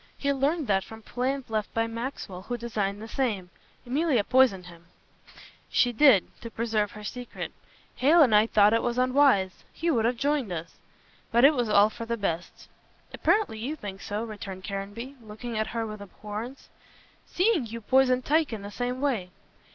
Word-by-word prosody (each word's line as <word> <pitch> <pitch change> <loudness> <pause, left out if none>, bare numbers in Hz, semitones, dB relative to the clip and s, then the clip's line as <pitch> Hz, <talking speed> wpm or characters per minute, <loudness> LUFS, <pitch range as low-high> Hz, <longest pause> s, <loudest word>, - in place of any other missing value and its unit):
He 280 0 0
learned 285 +4 0
that 195 -4 +1
from 220 +2 -12
plans 260 +4 -2
left 215 -1 -1
by 225 0 +2
Maxwell 230 -5 -5
who 245 +5 -4
designed 210 -4 -2
the - - -7
same. 215 -8 -2 0.3
Emilia 270 -2 +1
poisoned 250 -7 +3
him." 170 -1 -14 0.8
"She 245 -1 +2
did 235 -6 +6 0.2
to 230 - -7
preserve 220 -2 -1
her 210 - -10
secret. 245 +3 -6 0.5
Hale 310 +5 +6
and 245 -6 +3
I 210 +1 +6
thought 210 -1 +5
it 230 - +3
was 240 0 -1
unwise; 255 -7 +3
he 335 +1 -1
would 230 -6 +1
have 240 +1 +1
joined 280 -5 0
us. 170 -1 -6 0.5
But 235 +3 +5
it 295 - +7
was 245 -5 -1
all 210 +1 +5
for 230 0 -7
the 235 0 -1
best." 175 -5 -4 0.5
"Apparently 415 - +1
you 270 +8 -3
think 200 -8 -8
so," 205 +2 -3
returned 200 -4 -7
Caranby, 205 +8 -6
looking 225 +2 -7
at 220 0 0
her 230 -1 -3
with 215 -1 -7
abhorrence, 210 +6 -8 0.6
"seeing 365 - +1
you 230 +1 -6
poisoned 255 +2 +3
Tyke 310 -1 +2
in 210 -3 -5
the 205 - -7
same 250 +3 -3
way." 235 -11 0
230 Hz, 180 wpm, -27 LUFS, 205-260 Hz, 0.8 s, it